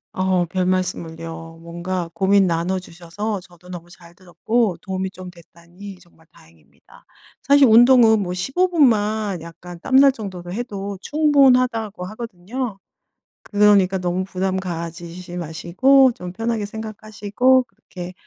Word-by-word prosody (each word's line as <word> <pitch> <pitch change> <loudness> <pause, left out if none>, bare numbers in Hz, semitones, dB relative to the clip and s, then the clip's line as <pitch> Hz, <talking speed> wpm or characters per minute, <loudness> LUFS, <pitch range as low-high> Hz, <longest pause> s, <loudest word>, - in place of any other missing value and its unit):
어우 185 -1 +1
별말씀을요. 165 -3 -3
뭔가 175 +1 -4
고민 195 0 +3
나눠 175 +2 -1
주셔서 185 +4 -6
저도 180 -1 -18
너무 175 -1 -9
잘 170 -1 -17
들었고 195 +3 -1
도움이 190 0 -4
좀 185 -1 -11
됐다니 175 +3 -14
정말 170 -2 -24
다행입니다. 80 -2 -22 0.4
사실 280 0 +5
'운동은 230 -1 +6
뭐 180 - -3
15 275 - 0
분만 215 - +1
약간 170 +1 -11
땀날 270 +6 +5
정도로 185 -7 -8
해도 200 -4 -5
충분하다.'고 255 -9 +2
하거든요. 215 +2 -6 0.6
그러니까 205 -2 +3
너무 180 +1 -2
부담 190 0 -2
가지지 175 0 -7
마시고 180 - +3
좀 180 -5 -8
편하게 225 +1 -3
생각하시고 215 +3 0
그렇게 180 -6 -11
190 Hz, 295 characters per minute, -21 LUFS, 175-220 Hz, 0.6 s, 운동은